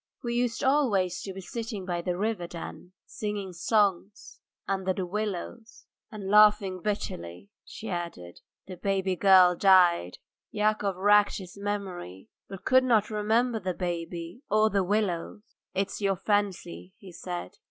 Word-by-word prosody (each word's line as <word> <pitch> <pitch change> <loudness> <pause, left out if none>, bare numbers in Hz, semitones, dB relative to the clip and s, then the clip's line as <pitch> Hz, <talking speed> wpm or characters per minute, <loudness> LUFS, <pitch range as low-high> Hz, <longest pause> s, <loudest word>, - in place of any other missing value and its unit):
We 235 -1 -2
used 240 +2 -1
always 215 -11 +2
to 195 - -6
be 190 - -8
sitting 220 0 -6
by 175 -2 -2
the 175 0 -2
river 205 -3 -2
then, 175 +1 -9
singing 205 -3 -5
songs... 200 +2 0 0.3
under 190 -1 0
the 185 0 -3
willows," 210 +4 -5 0.3
and 210 -3 -7
laughing 205 -2 +5
bitterly, 90 - -4
she 220 - -9
added: 170 - -6 0.2
"The 185 -1 -9
baby 190 0 0
girl 185 -1 +6
died." 175 - +4 0.3
Yakov 210 -2 0
racked 205 +2 +4
his 185 -3 -10
memory, 195 - -5 0.2
but 195 -1 -9
could 260 0 +5
not 225 -4 +2
remember 225 +3 +1
the 185 -2 -3
baby 175 +2 -5
or 215 +1 +3
the 200 -1 +2
willows. 205 0 -1 0.3
"It's 195 +2 -2
your 195 -1 +1
fancy," 185 - -2
he 190 - -13
said. 175 0 -7
195 Hz, 140 wpm, -28 LUFS, 180-210 Hz, 0.3 s, girl